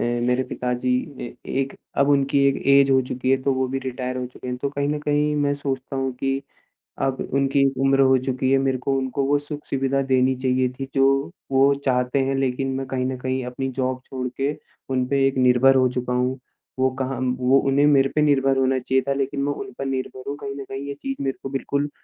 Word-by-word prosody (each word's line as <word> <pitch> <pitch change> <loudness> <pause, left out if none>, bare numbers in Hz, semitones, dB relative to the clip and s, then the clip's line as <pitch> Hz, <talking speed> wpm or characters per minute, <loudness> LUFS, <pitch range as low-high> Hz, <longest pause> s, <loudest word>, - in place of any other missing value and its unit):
ए 120 0 0
मेरे 125 +1 +2
पिताजी 125 0 -2 0.3
ए 120 - -6 0.3
एक 135 0 -2 0.3
अब 140 0 +4
उनकी 140 0 +3
एक 135 - -1 0.2
ऐज 135 0 +3
हो 135 0 +5
चुकी 130 +1 -2
है 135 - +5
तो 135 - +2
वो 130 0 0
भी 135 +1 -2
रिटायर 130 0 -3
हो 125 0 -3
चुके 125 - -11
हैं। 125 - -2
तो 140 +3 -2
कहीं 140 0 -1
न 150 0 -1
कहीं 150 0 +1
मैं 145 -1 +1
सोचता 135 -1 -4
हूँ 135 -1 -1
की, 135 +2 -2 0.6
अब 135 -1 0
उनकी 140 0 +3 0.2
उम्र 135 0 +3
हो 130 -1 +5
चुकी 130 0 0
है, 135 - +5
मेरे 135 -1 +1
को 135 +2 -1
उनको 135 +1 -1
वो 145 +1 +3
सुख-सुविधा 140 -2 -2
देनी 130 -1 +2
चाहिए 130 0 +1
थी 135 0 -4
जो 135 +3 +2 0.2
वो 135 +1 +5
चाहते 125 0 +1
हैं। 135 0 0
लेकिन 135 0 0
मैं 135 0 -3
कहीं 130 -1 -2
न 130 0 -2
कहीं 130 +1 -2
अपनी 125 +2 -3
जॉब 130 0 -2
छोड़ 130 -1 -4
के 140 +2 +1 0.4
उन 130 -1 +1
पे 135 0 +2
एक 135 -1 -2
निर्भर 125 +1 +5
हो 130 -1 +4
चुका 125 0 -2
हूँ। 125 +1 0 0.4
वो 130 0 +3
कहाँ 130 0 -2
म 125 -1 +1
वो 130 +2 +4
उन्हें 140 +2 +3
मेरे 135 -2 +4
पे 155 - +3
निर्भर 135 -2 +3
होना 130 0 +2
चाहिए 130 +1 +1
था 140 - +2
लेकिन 140 0 -2
मैं 145 +1 0
उन 200 +6 -7
पर 135 - -2
निर्भर 130 -1 -4
हूँ। 140 - -3
कहीं 140 0 -5
न 140 - -6
कहीं 135 +1 -5
ये 140 - -3
चीज़ 270 0 -4
मेरे 135 -1 -2
को 135 - -4
बिल्कुल 140 +1 -2
135 Hz, 235 wpm, -23 LUFS, 130-140 Hz, 0.6 s, हो